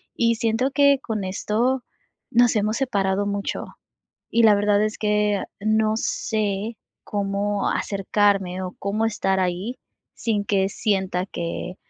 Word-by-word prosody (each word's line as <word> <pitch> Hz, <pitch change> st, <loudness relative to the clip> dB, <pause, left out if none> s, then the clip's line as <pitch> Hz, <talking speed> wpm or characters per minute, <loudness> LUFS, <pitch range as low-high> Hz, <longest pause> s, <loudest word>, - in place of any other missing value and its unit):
y 230 Hz, 0 st, +2 dB
siento 230 Hz, +3 st, 0 dB
que 280 Hz, -1 st, +4 dB
con 215 Hz, -6 st, -3 dB
esto, 235 Hz, +7 st, 0 dB, 0.5 s
nos 240 Hz, 0 st, +4 dB
hemos 215 Hz, +1 st, +1 dB
separado 200 Hz, -6 st, 0 dB
mucho. 200 Hz, 0 st, -3 dB, 0.6 s
Y 235 Hz, -, +3 dB
la 215 Hz, -2 st, +7 dB
verdad 205 Hz, 0 st, +3 dB
es 215 Hz, 0 st, -2 dB
que, 210 Hz, -1 st, +1 dB, 0.2 s
no 215 Hz, +1 st, +2 dB
sé, 215 Hz, -1 st, -2 dB, 0.3 s
cómo 200 Hz, 0 st, -1 dB
acercarme 195 Hz, -2 st, +1 dB
o 185 Hz, -1 st, -5 dB
cómo 210 Hz, +3 st, 0 dB
estar 195 Hz, -3 st, 0 dB
ahí, 185 Hz, +7 st, -2 dB, 0.4 s
sin 210 Hz, -3 st, -1 dB
que 195 Hz, -1 st, +1 dB
sienta 190 Hz, -3 st, -1 dB
que, 170 Hz, 0 st, -5 dB
205 Hz, 130 wpm, -23 LUFS, 195-225 Hz, 0.6 s, la